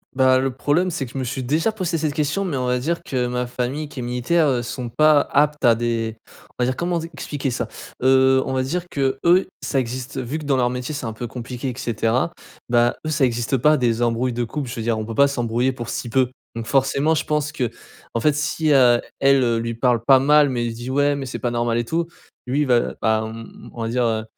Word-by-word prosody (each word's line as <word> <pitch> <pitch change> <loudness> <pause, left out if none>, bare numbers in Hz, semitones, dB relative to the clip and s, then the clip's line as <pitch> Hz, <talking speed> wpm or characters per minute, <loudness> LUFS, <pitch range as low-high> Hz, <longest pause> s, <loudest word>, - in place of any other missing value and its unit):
Bah, 130 0 +4
le 135 +1 0
problème 145 +8 0
c'est 155 -5 -3
que 120 - -12
je - - -7
me 130 - -2
suis 130 +2 -3
déjà 160 - +1
posé 180 -5 -2
cette 155 -2 -1
question. 150 +6 -1
Mais, 170 -6 -2
on 130 -1 -1
va 125 0 +1
dire, 170 +6 -2
que 125 -2 -1
ma 125 0 -2
famille 130 +5 -3
qui 140 - -9
est - - -3
militaire, 125 +7 +1
heu, 130 -3 +1
sont 120 +1 -5
pas 155 +4 +4
aptes 150 0 +2
à 115 -1 +6
des 115 -1 -2 0.4
on 125 - -3
va - - +3
dire, 130 +1 -1
comment 175 0 -1
dit 165 +1 -6
expliquer 145 -2 -3
ça? - - -2 0.3
Heu, 130 0 +5
on 135 - -3
va 130 0 +1
dire, 175 +7 -3
qu'eux, 140 +7 +2
ça 140 -1 -2
existe 130 +2 -3
vu 130 +4 -3
que, 155 - -8
dans 140 -1 +2
leur 125 -2 +2
métier, 125 +4 -4
c'est 140 - -5
un 115 - -3
peu 120 +2 -6
compliqué 125 +2 -6
et 125 - -6
cetera. 120 +3 0 0.4
Bah, 120 0 +3
eux, - - -1
ça 150 -3 +2
existe 120 +2 0
pas 150 +5 +4
des 120 -4 0
embrouilles 120 +2 +1
de 120 0 -1
couple. 135 +2 -5
Je - - -5
veux 115 - -4
dire, 115 0 0
on 110 - -3
peut 115 0 -6
pas 140 +3 +5
s'embrouiller 120 -1 0
pour 120 -2 -7
si 120 - -4
peu. 130 +1 +2 0.3
Donc, 115 -1 -4
forcément, 140 +4 +2
je 155 - -1
pense 150 -1 -1
qu'en 120 -3 -6
fait, 150 +4 +3
si 155 +1 0
à 125 -3 +5 0.2
elle, 135 -1 +4
heu, 115 -1 +1
lui 115 0 -3
parle 120 -1 +2
pas 130 +3 +6
mal 150 +2 +5
mais 120 -3 -1
il 115 - -3
dit: 120 +2 -7
«Ouais, 145 +2 +2
mais 135 - -4
c'est 130 - -5
pas 120 - -1
normal 120 -1 0
et 120 - +1
tout». 165 +7 -1 0.4
Lui 140 +4 +1
va, 125 -4 +2
bah, 110 -1 +2
on 115 +1 -7 0.3
on 120 - -7
va 115 - -2
dire, 125 +1 +1
heu, 110 -1 0
130 Hz, 255 wpm, -22 LUFS, 120-145 Hz, 0.4 s, à